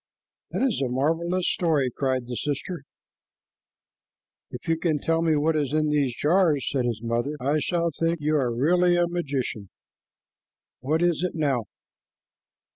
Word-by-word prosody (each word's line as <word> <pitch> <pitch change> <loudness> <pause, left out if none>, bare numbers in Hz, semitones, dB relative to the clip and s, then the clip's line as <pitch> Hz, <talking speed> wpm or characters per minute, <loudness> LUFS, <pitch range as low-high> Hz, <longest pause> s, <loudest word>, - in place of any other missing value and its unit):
"That - - -2
is 245 - +1
a 130 - 0
marvelous 165 +7 0
story," 150 -7 +1
cried 130 -2 -1
the 125 - -6
sister. 150 +6 -3 1.7
"If - - -9
you 165 - +3
can 165 -3 +1
tell 165 +2 0
me 160 -2 +2
what 155 +2 +1
is 145 -2 -1
in 155 0 +2
these 140 -5 +1
jars," 155 -3 +2
said 130 -3 0
his 115 -2 -2
mother, 120 +5 -1
"I 140 +4 +1
shall 170 +1 0
think 165 +2 -1
you 150 +1 0
are 130 -5 +1
really 175 +8 +3
a 175 0 +3
magician. 140 - -3 1.1
What 155 +6 0
is 175 -3 +2
it 180 -1 -2
now?" 140 -8 0
150 Hz, 155 wpm, -25 LUFS, 130-170 Hz, 1.7 s, you